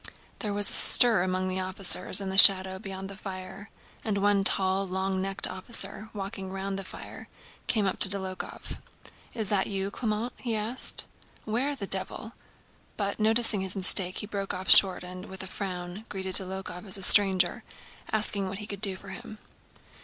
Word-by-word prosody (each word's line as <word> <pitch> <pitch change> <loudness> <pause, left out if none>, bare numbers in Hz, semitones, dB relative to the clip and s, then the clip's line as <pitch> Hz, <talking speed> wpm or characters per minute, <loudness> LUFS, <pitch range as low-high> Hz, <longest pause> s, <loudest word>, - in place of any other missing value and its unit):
There 210 -4 -5
was 205 0 -1
a - - +2
stir 230 -6 +3
among 185 0 -3
the 185 0 -3
officers 185 0 -1
in 195 -1 -6
the 190 - -6
shadow 190 -1 +7
beyond 195 0 -9
the 195 - -11
fire, 190 +1 -11 0.3
and 210 -3 -3
one 200 0 0
tall, 195 0 +1
long 190 +1 -4
necked 195 +1 -3
officer, 215 +2 -4
walking 195 -2 -8
round 195 0 -6
the - - -8
fire, - - -12 0.4
came 215 -4 -1
up 190 - -4
to - - +7
Dólokhov. 190 -2 -5 0.6
"Is 220 -4 -2
that 200 -2 -1
you, 195 0 -4
Clément?" 225 +2 -4
he 235 -3 -5
asked. 220 +4 +1 0.4
"Where 250 +7 -3
the 215 -7 -7
devil...?" 195 +4 -5 0.6
But, 200 0 -4
noticing 220 -1 +1
his 190 +1 -5
mistake, 185 -1 0
he - - -5
broke 200 -2 -6
off 185 +1 -2
short 190 -2 +11
and, 185 +2 -11
with 190 0 -9
a - - -8
frown, 185 +1 -8
greeted 190 -1 -6
Dólokhov 190 0 -3
as 190 - -2
a 195 - -9
stranger, 190 +3 +3 0.5
asking 205 -3 -1
what 190 - -8
he 210 - -8
could 200 -2 -9
do 195 -3 -2
for 195 +1 -14
him. 185 +3 -11
195 Hz, 180 wpm, -25 LUFS, 190-210 Hz, 0.6 s, short